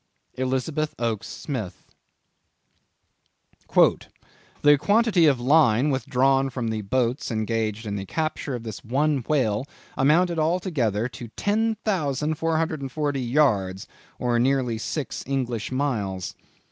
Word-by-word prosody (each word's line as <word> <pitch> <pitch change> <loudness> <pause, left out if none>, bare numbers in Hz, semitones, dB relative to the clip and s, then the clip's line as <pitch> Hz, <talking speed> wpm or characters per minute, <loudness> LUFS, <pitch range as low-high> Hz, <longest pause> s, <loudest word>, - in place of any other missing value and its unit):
—Elizabeth 130 +4 -1
Oakes 115 -3 -2
Smith. 120 - -6 1.9
"The 145 0 +2
quantity 205 - +4
of 135 -4 +3
line 135 0 +4
withdrawn 135 0 +2
from 120 -3 -3
the 110 -1 -2
boats 125 +4 -1
engaged 110 -1 -2
in 100 -1 -3
the 95 -1 -6
capture 155 -4 -2
of 120 - -6
this 110 -2 -7
one 140 +5 +1
whale, 130 -4 +1 0.3
amounted 165 +5 +3
altogether 155 - 0
to 120 -1 -9
10,440 160 - -1
yards 115 -7 +1 0.3
or 120 -1 +1
nearly 125 -3 +1
six 145 +4 -4
English 125 -5 -2
miles.... 105 -9 -2
130 Hz, 105 wpm, -24 LUFS, 115-155 Hz, 1.9 s, quantity